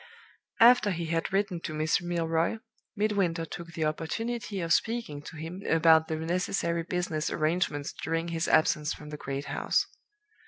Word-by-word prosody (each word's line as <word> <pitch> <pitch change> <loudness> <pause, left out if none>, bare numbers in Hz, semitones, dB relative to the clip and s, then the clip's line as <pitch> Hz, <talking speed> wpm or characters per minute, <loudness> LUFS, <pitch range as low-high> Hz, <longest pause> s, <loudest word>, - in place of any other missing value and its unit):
"After 235 -2 +7
he 170 -3 -2
had 165 0 -1
written 195 -2 0
to 155 - -5
Miss 155 +3 +1
Milroy, 170 +2 0 0.4
Midwinter 200 -6 +1
took 170 +1 -8
the 160 -1 -1
opportunity 205 +7 -3
of 165 -1 +1
speaking 225 -12 -1
to 150 - -10
him 165 +5 -6
about 160 -1 +5
the 160 - -2
necessary 170 +1 -1
business 165 -3 -2
arrangements 155 -2 0
during 165 +2 -2
his 165 -1 -1
absence 150 -1 +3
from 150 - -11
the 150 - -5
great 140 0 -4
house. - - +1
165 Hz, 155 wpm, -29 LUFS, 160-180 Hz, 0.4 s, After